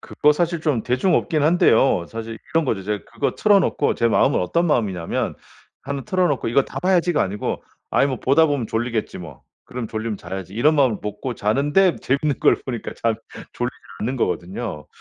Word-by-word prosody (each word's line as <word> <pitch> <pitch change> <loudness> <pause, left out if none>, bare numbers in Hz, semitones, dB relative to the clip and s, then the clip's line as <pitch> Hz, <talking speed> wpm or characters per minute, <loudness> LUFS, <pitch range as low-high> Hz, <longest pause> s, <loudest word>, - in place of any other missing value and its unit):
그거 150 0 +2
사실 170 +1 -1
좀 145 -8 0
대중 130 +9 +1
없긴 155 -4 +1
한데요 135 - +3
사실 115 0 -6 0.2
이런 165 -1 +3
거죠. 105 -7 -1
제가 105 -1 -3
그거 - - -2
틀어 205 -2 +4
놓고 145 - +1
제 115 -1 +2
마음은 - - +3
어떤 170 - +1
마음이냐면 100 - -1 0.5
1 140 0 -4
틀어 185 +5 +1
놓고 140 - -1
'이거 135 +4 +3
다 - - -7
봐야지.'가 180 -3 +2
아니고 100 +2 -3 0.3
'아이 140 - +3
뭐 130 -2 -3
보다 140 +5 +4
보면 145 -6 -1
졸리겠지 115 -1 -2
뭐. 80 -8 -10 0.2
그럼 125 -2 -5
졸리면 110 -1 -3
자야지.' 95 +1 -7
이런 150 +8 +3
마음을 130 -7 +3
먹고 105 +4 -4
자는데 145 - +2
재밌는 140 +1 -1
걸 - - +5
보니까 120 -4 -5
잠 115 -1 +2 0.4
졸리지 - - -2 0.3
않는 125 +5 -2
거거든요. 95 - -3
125 Hz, 390 characters per minute, -22 LUFS, 105-150 Hz, 0.5 s, 걸